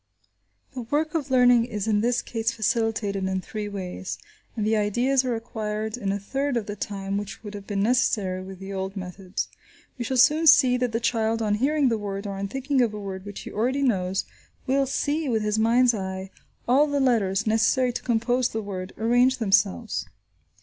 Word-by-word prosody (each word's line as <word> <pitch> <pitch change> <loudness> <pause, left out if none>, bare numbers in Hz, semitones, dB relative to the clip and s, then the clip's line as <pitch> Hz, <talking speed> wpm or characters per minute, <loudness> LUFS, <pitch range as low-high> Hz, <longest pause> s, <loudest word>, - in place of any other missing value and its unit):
The 255 - -5
work 295 +6 -1
of 305 -4 -2
learning 245 -2 +5
is 215 -3 -4
in 210 -1 +2
this 240 +1 +1
case 225 0 -1
facilitated 220 -3 -1
in 190 0 -1
three 210 +2 -5
ways, 190 -2 -5 0.4
and 215 - 0
the 220 +1 +2
ideas 240 +6 +2
are 250 -2 -1
acquired 220 -1 -4
in 200 -5 -2
a 200 - -1
third 270 +6 -2
of 225 - -2
the 205 - -5
time 195 -1 -3
which 205 +2 -8
would 210 -1 -7
have 200 -1 -9
been 200 -1 -1
necessary 210 -6 +1
with 190 0 -9
the 195 +1 -7
old 190 +1 -4
methods. 185 +1 -4 0.5
We - - -1
shall 260 +2 -2
soon 305 +6 +5
see 265 -6 +7
that 250 -1 -1
the 225 - 0
child, 225 -1 0
on 215 -2 0
hearing 275 +5 +2
the 225 -2 0
word, 200 0 -4
or 200 - -3
on 200 - -2
thinking 270 +4 0
of 225 -3 +1
a - - -5
word 190 -1 -6
which 205 - -7
he - - -8
already 255 +6 0
knows, 190 -6 0 0.4
will 275 +1 +2
see, 290 +2 -1
with 220 -3 +1
his 210 +1 0
mind's 240 +2 +4
eye, 190 -2 -5 0.4
all 275 +5 +4
the 285 -1 0
letters, 220 -8 +2
necessary 240 +3 +2
to - - -4
compose 240 +1 +1
the 220 0 -4
word, 185 -2 -6
arrange 245 +3 +3
themselves. 205 +1 +1
220 Hz, 200 wpm, -25 LUFS, 200-250 Hz, 0.5 s, see